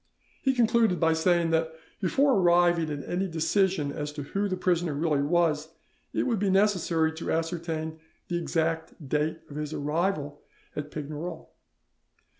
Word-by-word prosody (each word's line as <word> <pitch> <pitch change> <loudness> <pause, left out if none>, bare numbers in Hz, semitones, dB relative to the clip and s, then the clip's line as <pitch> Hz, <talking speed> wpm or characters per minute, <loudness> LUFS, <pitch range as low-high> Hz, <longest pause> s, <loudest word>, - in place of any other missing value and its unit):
He 265 -1 +2
concluded 230 -5 +3
by 165 -1 +3
saying 170 0 +2
that 160 0 +1 0.3
before 270 +9 +3
arriving 175 -4 +4
at 145 -2 -5
any 190 +2 -1
decision 165 -1 +1
as 150 +1 -4
to 145 - -5
who 200 +8 -1
the 185 - -1
prisoner 175 -4 +1
really 150 -1 +1
was, 160 0 +1 0.4
it - - 0
would 230 -5 0
be 200 0 +1
necessary 185 -5 +2
to 160 +1 -4
ascertain 160 -1 -2 0.3
the 175 -1 -1
exact 165 -2 -2
date 150 +3 0
of 145 - -9
his 150 0 -4
arrival 150 -1 -1 0.3
at 150 0 -4
Pignerol. 155 +3 -6
165 Hz, 150 wpm, -27 LUFS, 155-180 Hz, 0.4 s, arriving